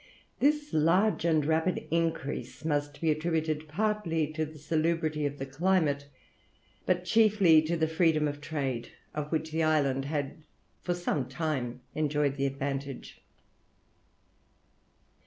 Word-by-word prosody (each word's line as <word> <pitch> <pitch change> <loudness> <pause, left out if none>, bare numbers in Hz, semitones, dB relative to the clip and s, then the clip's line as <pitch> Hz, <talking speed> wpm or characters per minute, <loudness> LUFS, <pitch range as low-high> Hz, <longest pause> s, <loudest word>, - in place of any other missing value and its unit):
This 295 +1 +2
large 170 +6 +3
and 155 -3 +3
rapid 160 +3 +1
increase 165 -3 -2
must 145 -2 -1
be 160 -1 +3
attributed 155 -1 -1
partly 175 -2 0
to 155 0 -1
the 155 +1 -12
salubrity 155 0 0
of 145 0 -6
the 135 - -4
climate, 145 -1 +1 0.8
but 180 -1 +1
chiefly 200 -6 +5
to 165 +2 -1
the 160 -1 +2
freedom 160 -2 +2
of 145 0 -5
trade, 135 -6 -3 0.2
of 150 0 -4
which 160 -1 -1
the 160 +1 0
island 140 -4 +2
had 145 0 -3 0.4
for 175 - -1
some 150 -7 -2
time 130 -7 -2
enjoyed 150 -2 +1
the 140 0 0
advantage. 135 0 -5
155 Hz, 130 wpm, -29 LUFS, 145-165 Hz, 0.8 s, chiefly